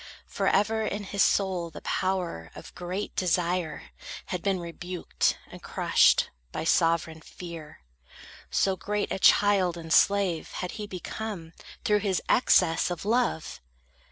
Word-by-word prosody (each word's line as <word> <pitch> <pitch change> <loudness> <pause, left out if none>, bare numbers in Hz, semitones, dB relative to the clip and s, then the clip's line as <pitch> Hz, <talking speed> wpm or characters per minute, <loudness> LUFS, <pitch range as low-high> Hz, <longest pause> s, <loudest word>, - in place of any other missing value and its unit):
For - - -2
ever 220 +2 +2
in 210 -1 -2
his 200 0 -2
soul 185 -4 +2
the 160 - -11
power 180 - -2
Of - - -11
great 180 +3 -5
desire 175 -3 -1 0.3
had 180 -2 -4
been 195 -1 0
rebuked 175 +1 -2
and - - -11
crushed - - +3 0.2
By - - -4
sovereign 165 -1 +1
fear. 165 - -10 0.7
So 195 -1 +1
great 205 +2 -2
a - - -2
child 190 -4 +4
and 165 -1 -3
slave 195 -5 +2
Had 180 - -4
he 210 -2 -6
become, 185 -2 -6 0.3
through 210 0 +3
his 195 -3 0
excess 180 -10 +4
of 175 +1 -5
love! 230 -7 0
185 Hz, 135 wpm, -27 LUFS, 170-200 Hz, 0.7 s, child